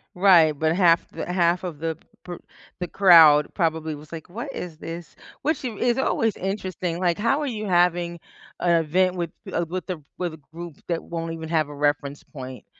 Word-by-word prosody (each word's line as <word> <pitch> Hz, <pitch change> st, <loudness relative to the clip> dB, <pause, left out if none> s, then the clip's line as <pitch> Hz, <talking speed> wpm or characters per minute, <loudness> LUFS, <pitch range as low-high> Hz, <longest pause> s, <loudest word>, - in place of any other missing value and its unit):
Right, 180 Hz, -4 st, +6 dB
but 160 Hz, +2 st, +1 dB
half 175 Hz, -3 st, +4 dB
the -, -, -5 dB
half 175 Hz, 0 st, +2 dB
of 170 Hz, -5 st, -6 dB
the 160 Hz, 0 st, -3 dB, 0.3 s
per 175 Hz, -1 st, -7 dB, 0.4 s
the 180 Hz, -, -3 dB
crowd 165 Hz, -6 st, +6 dB
probably 160 Hz, -3 st, -1 dB
was 150 Hz, +1 st, -14 dB
like, 165 Hz, +1 st, -8 dB
"What 240 Hz, +9 st, -6 dB
is 170 Hz, -3 st, -6 dB
this?" 165 Hz, -1 st, -8 dB, 0.3 s
which 310 Hz, -2 st, -1 dB
is 240 Hz, +1 st, 0 dB
always 225 Hz, -5 st, +1 dB
interesting, 185 Hz, -3 st, -3 dB
like, 175 Hz, -2 st, +1 dB
how 235 Hz, +7 st, +1 dB
are -, -, -1 dB
you 215 Hz, -4 st, -4 dB
having 175 Hz, -1 st, +2 dB, 0.4 s
a 170 Hz, -1 st, +3 dB
event 180 Hz, +4 st, +1 dB
with 170 Hz, -2 st, -3 dB, 0.2 s
a 170 Hz, -, 0 dB
with 180 Hz, +3 st, -6 dB
a 175 Hz, -4 st, -4 dB, 0.2 s
with 175 Hz, -3 st, -3 dB
a -, -, -10 dB, 0.2 s
group 170 Hz, -2 st, -8 dB
that 170 Hz, -2 st, -2 dB
won't 165 Hz, -1 st, -5 dB
even 160 Hz, -1 st, -7 dB
have 155 Hz, -3 st, +1 dB
a 145 Hz, -, -8 dB
reference 145 Hz, 0 st, -1 dB
point? 130 Hz, -3 st, -9 dB
170 Hz, 190 wpm, -24 LUFS, 160-185 Hz, 0.4 s, Right